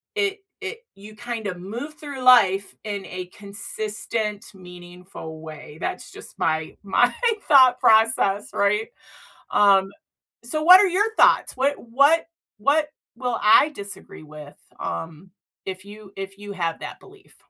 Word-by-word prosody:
it 420 -1 -1 0.2
it 430 +3 -5 0.2
you 210 +2 -13
kinda 220 -4 -5
move 235 +12 -7
through 285 -4 -8
life 200 -6 +4
in 205 -2 -5
a 185 0 -6
consistent, 210 +2 -5
meaningful 180 -3 -11
way. 155 -1 -11
That's - - -5
just - - -13
my 160 0 -1
my 225 +5 +2 0.3
thought 260 -4 +6
process, 220 -2 +3
right? 210 +2 +1 0.6
Um, 195 -1 +4 0.5
so 305 +6 -3
what 365 +3 +9
are 400 - +4
your 415 +5 0
thoughts? - - +4
What 275 +2 +1
what 280 +8 +3 0.3
what 295 +6 +2 0.3
will 245 -1 -3
I 220 +8 +6
disagree 200 - -10
with, 150 -1 -12 0.2
um, 165 - -6 0.3
if 190 -1 -6
you 205 -1 -13
if 195 0 -7
you 205 0 -9
have 170 -3 -3
that - - -8
belief? 395 0 -19
210 Hz, 135 wpm, -23 LUFS, 190-260 Hz, 0.6 s, what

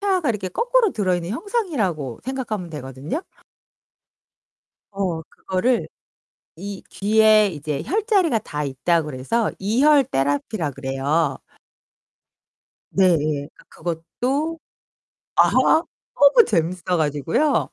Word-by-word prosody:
태아가 375 -8 +1 0.2
거꾸로 485 - +2
들어 185 -4 0
있는 175 +1 -3
형상이라고 230 - -2
생각하면 235 -8 -4
되거든요 145 - -5 1.7
어 185 -5 -2
그거를 190 +9 -1 0.7
이 195 +3 -7
뒤에 215 +1 +4
이제 150 -4 -4
혈자리가 395 - +2
다 150 -5 -4
있다 160 +5 +1
그래서 150 - -1
이혈 270 +8 +4
테라피라 145 - -1
그래요. 135 +4 -1 1.5
네. 195 - +3
예 145 -1 -2
그니까 - - -19 0.6
그것도 295 +6 0 0.8
아 - - +5 0.6
너무 285 - +6
재밌어 175 -2 0
가지고요. 160 - +1
195 Hz, 235 characters per minute, -22 LUFS, -, 1.7 s, 너무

